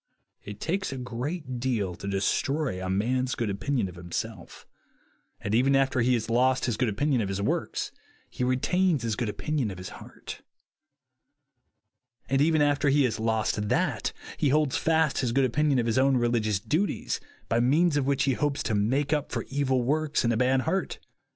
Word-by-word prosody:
It 105 Hz, 0 st, -8 dB
takes 190 Hz, +2 st, -2 dB
a 135 Hz, -, -5 dB
great 130 Hz, +2 st, -4 dB
deal 115 Hz, -7 st, -1 dB
to 100 Hz, -, -8 dB
destroy 100 Hz, +3 st, 0 dB
a 95 Hz, -, -3 dB
man's 125 Hz, +7 st, 0 dB
good 115 Hz, -4 st, -1 dB
opinion 115 Hz, +2 st, -1 dB
of 90 Hz, -, -9 dB
himself; 90 Hz, +2 st, -6 dB, 0.7 s
and 100 Hz, -, -4 dB
even 130 Hz, +4 st, +4 dB
after 135 Hz, -1 st, +2 dB
he 125 Hz, +1 st, +3 dB
has 115 Hz, -2 st, -2 dB
lost 130 Hz, +3 st, +2 dB
his 120 Hz, -, 0 dB
good 125 Hz, +1 st, +1 dB
opinion 130 Hz, +4 st, +1 dB
of 100 Hz, -, -2 dB
his 100 Hz, 0 st, -2 dB
works, 100 Hz, -, -2 dB, 0.4 s
he -, -, -4 dB
retains 150 Hz, +4 st, +1 dB
his 115 Hz, -2 st, -1 dB
good 115 Hz, -1 st, -2 dB
opinion 145 Hz, +1 st, -2 dB
of 95 Hz, -, -7 dB
his 90 Hz, +1 st, -7 dB
heart; -, -, -10 dB, 1.9 s
and 135 Hz, +1 st, +2 dB
even 155 Hz, 0 st, +4 dB
after 145 Hz, 0 st, +2 dB
he 140 Hz, +1 st, +4 dB
has 115 Hz, -4 st, 0 dB
lost 110 Hz, -2 st, 0 dB
that, -, -, 0 dB, 0.3 s
he 145 Hz, -, +2 dB
holds 150 Hz, -1 st, +2 dB
fast 160 Hz, -2 st, +2 dB
his 125 Hz, -4 st, 0 dB
good 135 Hz, +1 st, +3 dB
opinion 145 Hz, +2 st, +2 dB
of 120 Hz, -, +1 dB
his 115 Hz, +2 st, +1 dB
own 135 Hz, 0 st, +4 dB
religious 115 Hz, -4 st, +1 dB
duties, 155 Hz, -, -1 dB, 0.3 s
by 115 Hz, -, +1 dB
means 150 Hz, +7 st, +3 dB
of 140 Hz, -2 st, +1 dB
which 140 Hz, -1 st, +2 dB
he 135 Hz, -, +2 dB
hopes 145 Hz, +2 st, -1 dB
to 110 Hz, -, -1 dB
make 130 Hz, +8 st, +1 dB
up 150 Hz, -2 st, -1 dB
for -, -, -3 dB
evil 130 Hz, -2 st, +1 dB
works 150 Hz, +3 st, 0 dB
and 115 Hz, 0 st, +2 dB
a -, -, 0 dB
bad 130 Hz, +2 st, +3 dB
heart. 180 Hz, +7 st, -1 dB
130 Hz, 190 wpm, -27 LUFS, 110-145 Hz, 1.9 s, even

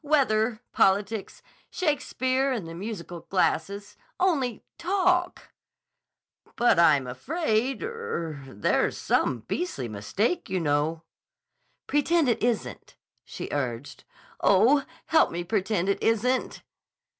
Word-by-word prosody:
Weather. 240 Hz, -6 st, +2 dB
Politics. 200 Hz, +2 st, +1 dB, 0.3 s
'Shakespeare 270 Hz, -4 st, 0 dB
and 220 Hz, -10 st, -3 dB
the 165 Hz, -, -7 dB
musical 175 Hz, -2 st, -6 dB
glasses.' 195 Hz, +2 st, -1 dB, 0.2 s
Only, 280 Hz, -, +1 dB, 0.2 s
talk!" 360 Hz, 0 st, 0 dB, 1.0 s
"But 240 Hz, -7 st, +3 dB
I'm 145 Hz, -5 st, +5 dB
afraid—er—there's 215 Hz, -, -2 dB
some 120 Hz, -, 0 dB
beastly 135 Hz, -, -3 dB
mistake, 195 Hz, -, -2 dB
you 185 Hz, 0 st, 0 dB
know." 155 Hz, +1 st, 0 dB, 0.8 s
"Pretend 300 Hz, +2 st, +2 dB
it 230 Hz, -1 st, 0 dB
isn't," 235 Hz, -2 st, -2 dB, 0.3 s
she -, -, -7 dB
urged. 130 Hz, -2 st, -4 dB, 0.4 s
"Oh, 240 Hz, +9 st, +4 dB, 0.2 s
help 320 Hz, -, +4 dB
me 175 Hz, +1 st, -4 dB
pretend 190 Hz, -1 st, 0 dB
it 200 Hz, -, 0 dB
isn't." 245 Hz, +3 st, 0 dB
215 Hz, 100 wpm, -26 LUFS, 170-275 Hz, 1.0 s, I'm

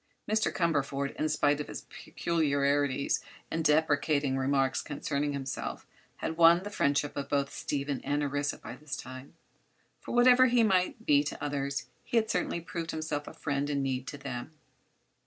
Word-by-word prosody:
Mr. 215 Hz, +1 st, +2 dB
Cumberford, 140 Hz, -5 st, 0 dB
in 155 Hz, -, 0 dB
spite 145 Hz, -1 st, +2 dB
of -, -, -6 dB
his -, -, -6 dB
peculiarities 140 Hz, -4 st, 0 dB, 0.3 s
and 165 Hz, -, -1 dB
deprecating 150 Hz, -2 st, +2 dB
remarks 135 Hz, 0 st, +1 dB
concerning 145 Hz, 0 st, -2 dB
himself 135 Hz, -2 st, -4 dB, 0.3 s
had 160 Hz, -, -4 dB
won 170 Hz, +1 st, +7 dB
the 205 Hz, -, -6 dB
friendship 145 Hz, -5 st, +1 dB
of 140 Hz, -, -4 dB
both 140 Hz, -1 st, 0 dB
Stephen 140 Hz, -1 st, -2 dB
and 145 Hz, +1 st, 0 dB
Orissa 145 Hz, 0 st, -1 dB
by 120 Hz, -, -9 dB
this 150 Hz, +1 st, -6 dB
time; 130 Hz, +1 st, -9 dB, 0.6 s
for -, -, -6 dB
whatever 250 Hz, +1 st, +7 dB
he 240 Hz, -1 st, +4 dB
might 195 Hz, +2 st, +1 dB
be 145 Hz, -1 st, +5 dB
to -, -, -5 dB
others 140 Hz, -3 st, -2 dB, 0.2 s
he 240 Hz, -, -1 dB
had 220 Hz, -1 st, +2 dB
certainly 170 Hz, -, -1 dB
proved 165 Hz, 0 st, -5 dB
himself 155 Hz, -2 st, -3 dB
a -, -, -8 dB
friend 140 Hz, 0 st, -2 dB
in 140 Hz, -1 st, 0 dB
need 130 Hz, -1 st, -2 dB
to 145 Hz, -, -6 dB
them. 125 Hz, +1 st, -6 dB
145 Hz, 165 wpm, -30 LUFS, 140-165 Hz, 0.6 s, won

